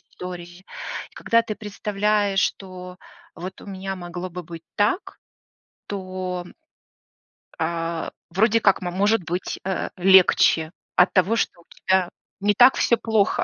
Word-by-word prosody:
истории. 180 0 -9 0.5
И - - -26
когда 230 - +3
ты 215 -2 -4
представляешь, 210 -1 0
что 180 -1 -4 0.4
"вот 185 +3 -8
у - - -13
меня 195 -1 -5
могло 175 0 -6
бы 180 +1 -6
быть 165 0 -10
так", 210 - 0 0.7
то, 185 -2 -4 1.2
а, 165 0 -2 0.2
вроде 220 +5 +3
как 195 -1 +3
мо 180 - -3
может 200 +2 +2
быть, 180 +2 -3
э, 190 -1 -2
легче 180 -3 +5 0.2
от 180 - +4
того, 190 +4 +3
что 175 -6 -1
у - - -25 0.2
тебя 185 -1 +3 0.3
не 205 +1 +3
так 250 +3 +7
всё 235 - +3
плохо. 220 -4 +1
185 Hz, 140 wpm, -23 LUFS, 175-205 Hz, 1.2 s, так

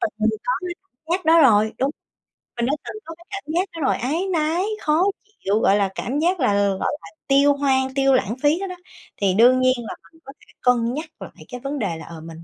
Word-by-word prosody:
từng 345 -3 0 0.3
có - - +1
cái 360 -2 -5
cảm 380 -10 -47 0.2
giác 370 0 -1
đó 325 +1 +6
rồi. 220 -3 +4
Đúng, 270 +2 +1 0.7
mình 235 - 0
đã 270 - 0
từng - - -7
có 330 - -8
cái 340 - -19
cảm 395 -1 -6
giác 355 +3 +2
đó 330 - -6
rồi, 265 - +2
áy 315 +10 -1
náy, 325 +3 +1 0.2
khó 310 +3 +2 0.4
chịu, 205 +2 +2
gọi 200 -3 +4
là, 200 -2 +1
cảm 275 +5 -2
giác 355 +3 +1
là, 250 -7 +2 0.2
gọi 190 - -1
là, - - -12 0.2
tiêu 280 +1 +5
hoang, 265 -2 +1
tiêu 270 -1 +3
lãng 225 -2 +1
phí 295 +4 +3
đó 390 - -3
đó, 365 - -6 0.5
thì 195 -2 +3
đương 245 +5 +5
nhiên 255 0 +4
là 235 -2 -6 0.2
mình 325 - -22
có 275 - -10
thể - - -23
cân 240 -1 +2
nhắc 305 +4 -4 0.2
lại - - -11
cái 250 - -7
vấn 275 +2 -4
đề 180 -7 -2
là, 160 - -10
ờ, 165 -1 -10
mình 165 0 -10
270 Hz, 245 wpm, -22 LUFS, 230-325 Hz, 0.7 s, đó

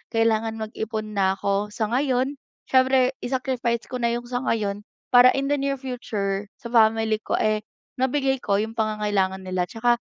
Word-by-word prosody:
kailangan 225 0 +2
mag-ipon 220 0 -4
na 190 -2 +1
ako 200 +1 -1
sa 220 -2 -1
ngayon. 260 +1 +1 0.3
Siyempre, 260 0 +4
i-sacrifice 245 -2 -1
ko 250 - -3
na 235 -1 0
yung 240 0 -4
sa 245 +1 -2
ngayon 205 -2 -1 0.2
para 250 0 +7
in 275 0 -1
the 290 - +2
near 275 0 0
future, 210 -6 -3 0.2
sa 235 - -7
family 220 -1 +3
ko, - - -3
eh, 215 0 +1 0.3
mabigay 265 +1 +1
ko 200 -5 0
yung 225 +1 -5
pangangailangan 205 -3 0
nila. 185 -1 -1
Tsaka 240 +4 +1
225 Hz, 165 wpm, -24 LUFS, 210-255 Hz, 0.3 s, para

